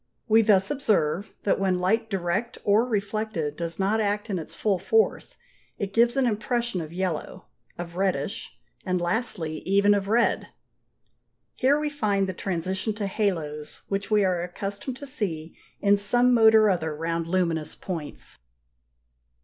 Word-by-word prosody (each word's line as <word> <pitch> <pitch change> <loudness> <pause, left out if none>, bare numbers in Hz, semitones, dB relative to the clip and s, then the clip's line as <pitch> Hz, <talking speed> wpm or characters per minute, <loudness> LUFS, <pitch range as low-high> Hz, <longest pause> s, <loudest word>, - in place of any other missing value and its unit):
We 225 +1 +6
thus 200 -3 +3
observe 200 - 0
that 200 - +1
when 190 -2 +1
light 220 +5 +1
direct 195 +4 -2
or 210 +3 +4
reflected 205 -8 -2
does 170 0 -4
not 205 +3 +1
act 205 +1 -1
in 185 - -1
its 160 - -8
full 200 -4 0
force, 450 - +1 0.4
it 200 -1 -4
gives 235 +3 +4
an 270 - +3
impression 235 -2 -1
of 155 -1 -7
yellow, 180 0 -3 0.3
of 175 0 -7
reddish, 190 +1 -2 0.3
and 180 -1 0
lastly 175 -4 -1
even 200 +2 +3
of 200 -1 0
red. 230 +3 +2 1.1
Here 280 +3 +3
we 300 - -1
find 205 -8 +1
the 185 - -3
transition 190 +4 -2
to 210 -1 -3
halos 165 -8 -2
which 195 +1 -2
we 210 -2 +4
are 180 -2 +1
accustomed 200 +7 -5
to 285 - -8
see 170 - -4 0.3
in 205 0 +4
some 245 +5 +3
mode 220 -2 +6
or 215 -2 +6
other 160 -4 -1
round 165 +1 -2
luminous 170 -3 0
points. 165 -6 -6
195 Hz, 155 wpm, -26 LUFS, 175-220 Hz, 1.1 s, We